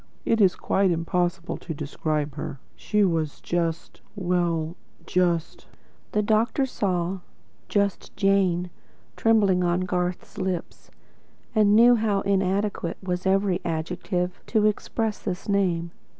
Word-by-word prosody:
It 225 -1 +2
is 190 -2 +5
quite 195 0 +1
impossible 175 +1 -1
to 160 - -6
describe 150 0 -2
her. 140 -1 -6 0.2
She 210 0 +1
was 160 -5 0
just 165 -1 -2
well, 175 -4 0 0.3
just 175 -3 0 0.2
" - - -35
The 210 - +2
doctor 225 +6 +2
saw 185 -6 -1 0.5
"just 200 -1 -1
Jane" 185 -3 +2 0.4
trembling 200 -5 +3
on 175 +1 +1
Garth's 180 +1 -3
lips, 185 -3 -4 0.6
and 210 -2 +4
knew 240 +2 +7
how 210 -3 +1
inadequate 195 -2 0
was 180 0 -2
every 190 -1 +2
adjective 180 +2 -2
to 215 -2 +2
express 215 +1 -1
this 185 -3 -5
name. 180 -4 +1
185 Hz, 120 wpm, -25 LUFS, 170-200 Hz, 0.6 s, knew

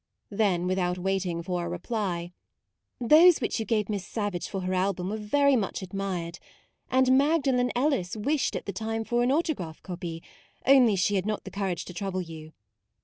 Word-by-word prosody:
" - - -51
Then 200 -4 +1
without 180 -1 0
waiting 180 -2 -1
for 180 -1 -2
a 170 - -3
reply: 175 -2 -3 0.7
u 240 - -3
Those 330 +4 +8
which 235 - -1
you 220 - -3
gave 215 -3 +1
Miss 205 -3 -3
Savage 205 -4 -3
for 195 - -4
her 185 0 -2
album 185 0 0
were 215 - -2
very 280 +6 +3
much 200 -4 -2
admired; 180 -3 -4 0.5
and 260 0 +4
Magdalen 270 -4 +2
Ellis 245 -8 0
wished 280 +7 0
at - - -4
the 200 - -4
time 225 +3 -3
for 240 +2 0
an 245 +2 +2
autograph 280 - -2
copy, 170 -2 -6 0.4
only 255 -5 +6
she 190 +2 +1
had 190 +2 -2
not 215 -1 -2
the - - -9
courage 190 -4 -3
to 180 - -9
trouble 185 0 -3
you. 160 -2 -10
200 Hz, 190 wpm, -27 LUFS, 180-240 Hz, 0.7 s, Those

